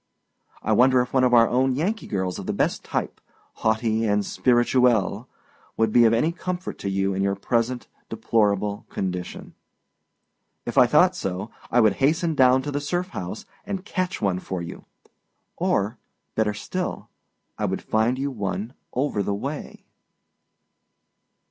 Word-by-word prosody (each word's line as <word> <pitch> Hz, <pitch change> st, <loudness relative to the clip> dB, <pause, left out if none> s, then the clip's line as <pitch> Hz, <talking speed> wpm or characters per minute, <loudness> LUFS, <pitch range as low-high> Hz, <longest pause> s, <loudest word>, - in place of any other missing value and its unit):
I -, -, 0 dB
wonder 130 Hz, 0 st, +5 dB
if 125 Hz, -, -5 dB
one 130 Hz, -1 st, +3 dB
of 125 Hz, -, +4 dB
our 115 Hz, -1 st, +6 dB
own 130 Hz, +1 st, +2 dB
Yankee 200 Hz, +10 st, -1 dB
girls 95 Hz, -3 st, -2 dB
of -, -, -7 dB
the -, -, 0 dB
best -, -, 0 dB
type, -, -, -3 dB, 0.4 s
haughty 110 Hz, 0 st, +1 dB
and 105 Hz, -1 st, +1 dB
spirituelle, 120 Hz, -2 st, +2 dB, 0.5 s
would 110 Hz, -1 st, +2 dB
be 120 Hz, -1 st, +6 dB
of 110 Hz, -, +5 dB
any 135 Hz, +9 st, +2 dB
comfort 185 Hz, +1 st, -5 dB
to 100 Hz, -, -3 dB
you 95 Hz, 0 st, 0 dB
in 95 Hz, -, -1 dB
your 100 Hz, 0 st, +1 dB
present 120 Hz, +4 st, -1 dB, 0.2 s
deplorable 105 Hz, -2 st, 0 dB
condition. 90 Hz, -2 st, -5 dB, 1.1 s
If 120 Hz, -, -4 dB
I 125 Hz, -3 st, +7 dB
thought 180 Hz, +8 st, +4 dB
so, 95 Hz, -, -4 dB, 0.2 s
I 120 Hz, -, +4 dB
would 110 Hz, -3 st, +4 dB
hasten 160 Hz, +4 st, +2 dB
down 130 Hz, -2 st, +4 dB
to 145 Hz, -, -3 dB
the 145 Hz, 0 st, -2 dB
Surf 175 Hz, +6 st, -2 dB
House 90 Hz, -, -6 dB, 0.2 s
and 195 Hz, -1 st, -5 dB
catch 185 Hz, -3 st, -2 dB
one 95 Hz, -3 st, 0 dB
for 95 Hz, 0 st, -5 dB
you; 85 Hz, -1 st, -8 dB, 0.7 s
or, 105 Hz, +4 st, 0 dB, 0.3 s
better 105 Hz, -1 st, 0 dB
still, 180 Hz, -, -4 dB, 0.5 s
I -, -, 0 dB
would -, -, -2 dB
find 110 Hz, +4 st, +1 dB
you 140 Hz, +1 st, -2 dB
one 100 Hz, 0 st, -4 dB, 0.2 s
over 130 Hz, -5 st, 0 dB
the 100 Hz, 0 st, -1 dB
way. 140 Hz, +8 st, -6 dB
120 Hz, 155 wpm, -24 LUFS, 100-135 Hz, 1.1 s, I